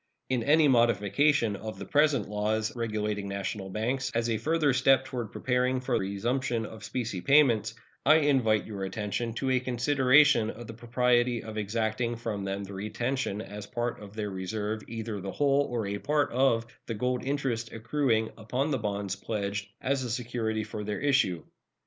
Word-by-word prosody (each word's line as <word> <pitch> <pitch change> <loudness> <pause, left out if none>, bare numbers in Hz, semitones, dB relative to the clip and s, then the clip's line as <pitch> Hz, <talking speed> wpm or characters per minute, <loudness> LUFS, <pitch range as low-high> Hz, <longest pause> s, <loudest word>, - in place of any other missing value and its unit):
In 130 -2 +1
any 150 +4 +5
modification 120 +1 +3
of 110 +2 -7
the - - -7
present 150 -1 +2
laws 105 +2 -1
regulating 105 -3 -2
national 100 0 -4
banks, 120 +7 -1
as 115 0 +1
a 110 - 0
further 155 +1 +2
step 130 +1 +4
toward 120 -5 -5
preparing 125 0 0
for 125 0 -3
resumption 115 +4 -1
of 110 0 -10
specie 115 -8 -3
payments, 120 -6 +4 0.3
I 155 +3 +6
invite 130 -8 +3
your 100 -3 -5
attention 105 +4 -3
to 130 +1 -1
a 130 - +3
consideration 130 -1 +4
of 120 +2 -7
the 115 - -8
propriety 120 +1 +1
of 110 -1 -7
exacting 110 +3 -1
from 110 -4 -4
them 100 +1 -3
the 100 0 -8
retention 110 +3 -2
as 105 0 -8
a - - -24
part 120 -2 -3
of 105 0 -11
their 105 -2 -3
reserve 105 +3 -3
either 110 -3 -5
the 95 0 -5
whole 140 0 +2
or 115 -3 -2
a 100 +1 -3
part 145 -1 +1
of 120 -2 +2 0.2
the 115 - -3
gold 125 +3 -1
interest 130 -5 -2
accruing 115 -1 0
upon 125 +7 -1
the 135 - 0
bonds 100 -2 -2
pledged 100 -1 -3
as 130 -2 -1
security 115 -2 -2
for 105 0 -6
their 105 0 -3
issue. 135 - +2
115 Hz, 175 wpm, -29 LUFS, 105-130 Hz, 0.3 s, I